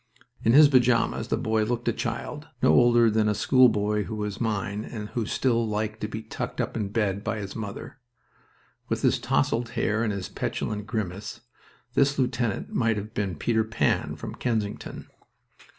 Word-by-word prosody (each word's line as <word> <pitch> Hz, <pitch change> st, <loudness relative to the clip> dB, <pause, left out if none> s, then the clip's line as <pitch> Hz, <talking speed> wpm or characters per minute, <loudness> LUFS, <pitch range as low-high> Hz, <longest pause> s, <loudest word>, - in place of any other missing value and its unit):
In 115 Hz, -, +4 dB
his 150 Hz, +2 st, +9 dB
pajamas 125 Hz, -4 st, +2 dB
the -, -, 0 dB
boy 110 Hz, 0 st, +1 dB
looked 120 Hz, +2 st, -2 dB
a 120 Hz, -, +3 dB
child, 150 Hz, +6 st, -4 dB, 0.2 s
no -, -, +6 dB
older 120 Hz, -2 st, +5 dB
than 105 Hz, 0 st, +2 dB
a 105 Hz, -, +1 dB
schoolboy 105 Hz, -4 st, +3 dB
who 110 Hz, -, -5 dB
was 105 Hz, 0 st, -4 dB
mine 105 Hz, -2 st, -1 dB
and 105 Hz, -3 st, -7 dB
who 115 Hz, -4 st, -2 dB
still 115 Hz, -3 st, +1 dB
liked 110 Hz, 0 st, -3 dB
to 105 Hz, -, -1 dB
be 110 Hz, +1 st, -6 dB
tucked 110 Hz, -, -5 dB
up -, -, -2 dB
in 105 Hz, -3 st, -1 dB
bed 100 Hz, -2 st, -1 dB
by 110 Hz, 0 st, -2 dB
his 100 Hz, -2 st, -6 dB
mother. 110 Hz, +4 st, -7 dB, 0.9 s
With -, -, -1 dB
his -, -, +3 dB
tousled 115 Hz, +1 st, 0 dB
hair 110 Hz, +1 st, +1 dB
and 110 Hz, -, 0 dB
his 100 Hz, -2 st, -4 dB
petulant 105 Hz, -1 st, -3 dB
grimace, 100 Hz, 0 st, -4 dB, 0.5 s
this 140 Hz, +2 st, +3 dB
lieutenant 125 Hz, -5 st, -1 dB
might 115 Hz, -3 st, +1 dB
have 105 Hz, +2 st, -6 dB
been 100 Hz, -5 st, -2 dB
Peter 110 Hz, +7 st, +1 dB
Pan, 110 Hz, +1 st, 0 dB
from -, -, -7 dB
Kensington. 110 Hz, -4 st, -3 dB
110 Hz, 175 wpm, -26 LUFS, 105-120 Hz, 0.9 s, his